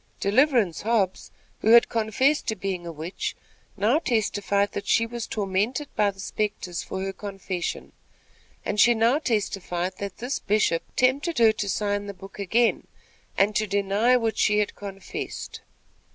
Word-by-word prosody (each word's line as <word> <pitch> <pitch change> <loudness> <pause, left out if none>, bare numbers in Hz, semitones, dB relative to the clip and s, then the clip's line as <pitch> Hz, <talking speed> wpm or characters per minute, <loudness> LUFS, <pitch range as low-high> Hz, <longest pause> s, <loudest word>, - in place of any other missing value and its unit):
Deliverance 225 - +2
Hobbs, 210 -4 0 0.3
who 220 - +4
had 235 - +8
confessed 235 +7 +1
to 220 - 0
being 185 -3 -4
a - - -4
witch, 165 +3 -5 0.4
now 220 +9 +3
testified 205 -6 0
that - - -5
she 230 - +3
was 235 0 -5
tormented 210 +8 -1
by 205 -1 +3
the 195 -1 -9
spectres 195 -4 -3
for 190 0 -5
her 195 0 -3
confession. 195 -3 -5 0.7
And 210 - -2
she 240 +3 +6
now 230 +6 +3
testified 190 - -2
that 200 -1 -5
this 250 +4 -3
Bishop 200 -5 +1
tempted 275 +6 +1
her 230 -2 +6
to 210 -2 -3
sign 205 +1 -1
the 200 - -6
book 195 +2 -12
again, 225 +4 +1 0.5
and 205 +2 +3
to 215 - +1
deny 205 +5 +2
what 225 -3 -1
she 210 0 +3
had 210 -1 +1
confessed. 195 -1 -7
205 Hz, 155 wpm, -25 LUFS, 195-230 Hz, 0.7 s, had